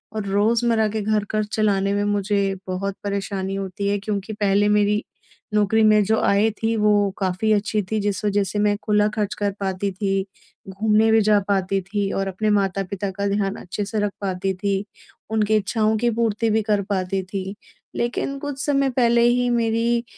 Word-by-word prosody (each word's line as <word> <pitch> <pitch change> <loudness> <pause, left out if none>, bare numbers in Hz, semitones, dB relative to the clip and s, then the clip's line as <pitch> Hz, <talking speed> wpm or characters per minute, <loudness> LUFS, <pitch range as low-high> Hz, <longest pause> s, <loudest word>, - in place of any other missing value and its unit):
और 215 -2 -3
रोज़मर्रा 220 +2 +2
के 215 +1 -3
घर 210 0 +1
खर्च 215 -1 -1
चलाने 200 -3 +1
में 205 0 0
मुझे 200 -1 0
बहुत 190 +1 -3
परेशानी 195 -1 -3
होती 195 +1 -3
है 205 - +1
क्योंकि 205 +1 -4
पहले 205 0 +2
मेरी 210 0 +2 0.5
नौकरी 210 +1 +3
में 215 -1 +5
जो 220 +2 +2
आय 200 +2 +3
थी 225 0 +1
वो 210 -1 +3
काफ़ी 190 +3 0
अच्छी 210 +1 0
थी 220 - +1
जिस 200 -2 -2
वजह 205 0 +2
से 195 +2 -3
मैं 205 0 +2
खुला 210 0 +3
खर्च 210 -1 -1
कर 205 -1 0
पाती 195 0 -2
थी, 195 0 -1 0.4
घूमने 215 +3 +2
भी 220 0 +5
जा 210 0 +4
पाती 195 -1 0
थी 195 +1 -2
और 195 0 -1
अपने 215 +3 -1
माता-पिता 195 -1 0
का 200 +1 -2
ध्यान 200 0 0
अच्छे 200 +3 -4
से 215 +2 -3
रख 205 -1 0
पाती 190 -1 -1
थी। 195 +1 -1 0.5
उनकी 215 -1 +2
इच्छाओं 215 +1 +1
की 240 +2 +1
पूर्ति 225 0 0
भी 220 +1 +2
कर 210 -1 +1
पाती 190 -1 -1
थी। 190 +1 -5 0.4
लेकिन 245 +3 -2
कुछ 285 -1 -5
समय 275 -2 +2
पहले 235 -1 +3
ही 245 +1 +3
मेरी 235 0 +1
205 Hz, 185 wpm, -22 LUFS, 195-220 Hz, 0.5 s, में